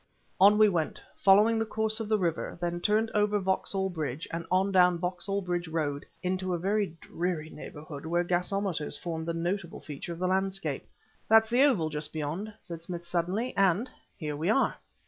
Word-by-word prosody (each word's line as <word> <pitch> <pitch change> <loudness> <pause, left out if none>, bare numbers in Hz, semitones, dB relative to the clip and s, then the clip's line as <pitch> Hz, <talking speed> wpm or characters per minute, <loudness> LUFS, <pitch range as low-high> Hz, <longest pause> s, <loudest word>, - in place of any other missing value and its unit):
On 200 +2 +7
we 215 0 +7
went, 170 -6 -1 0.2
following 210 +4 +5
the - - +2
course 220 0 -1
of 220 -2 -4
the 215 - +4
river, 170 -4 -2
then 175 0 -2
turned 215 +3 +2
over 210 0 +2
Vauxhall 190 0 0
Bridge 155 -3 -4
and 165 0 -4
on 190 +2 +2
down 180 -2 +5
Vauxhall 185 +3 -2
Bridge 175 -1 -2
Road 150 -3 -2 0.2
into 185 0 -1
a - - -1
very 195 -1 0
dreary 165 -3 -3
neighborhood 150 0 -8
where 175 +1 +2
gasometers 180 -3 -1
formed 165 -1 -4
the 170 - 0
notable 170 +1 -2
feature 150 +3 -7
of 170 - -5
the 185 - -2
landscape. 190 +1 0 0.4
"That's 220 0 +6
the 245 +2 +4
Oval 195 - +2
just 150 0 -4
beyond," 160 +8 -3
said 170 -2 -8
Smith 170 0 -6
suddenly, 180 +8 -1
"and 195 +5 +2 0.3
here 150 -3 -3
we 160 +6 -1
are." 225 +5 +2
180 Hz, 185 wpm, -29 LUFS, 165-200 Hz, 0.4 s, On